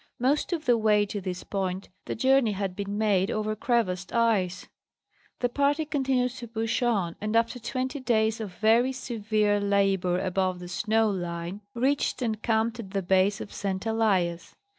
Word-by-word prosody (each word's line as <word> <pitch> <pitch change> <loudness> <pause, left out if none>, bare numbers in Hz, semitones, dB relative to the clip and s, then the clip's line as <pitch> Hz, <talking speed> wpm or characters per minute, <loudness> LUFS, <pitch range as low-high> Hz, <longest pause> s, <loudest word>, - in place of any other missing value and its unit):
Most 275 +8 +1
of 330 -3 -2
the 240 -2 +4
way 210 -1 +3
to 205 0 -5
this 185 -1 -5
point 190 -1 -3 0.2
the - - -3
journey 260 -2 +3
had 195 -2 -3
been 200 0 -4
made 200 -3 +2
over 215 -1 -1
crevassed 195 -6 0
ice. 195 -6 +1 0.7
The 245 - +3
party 285 +4 +1
continued 265 -4 0
to 240 -1 -8
push 225 +2 -2
on, 200 -9 +1
and 215 +1 -2
after 230 +2 +1
twenty 255 +4 -3
days 225 -3 +1
of 210 -4 -5
very 230 +4 +3
severe 215 -4 0
labor 195 -3 +2
above 185 -1 0
the 175 0 -8
snow 220 +4 +1
line 175 +1 -4
reached 265 +2 0
and 220 -2 -2
camped 225 +1 0
at 205 -5 -7
the 195 0 -2
base 190 +3 +2
of - - -8
St. 195 0 -3
Elias. 195 -7 0
215 Hz, 170 wpm, -27 LUFS, 190-235 Hz, 0.7 s, the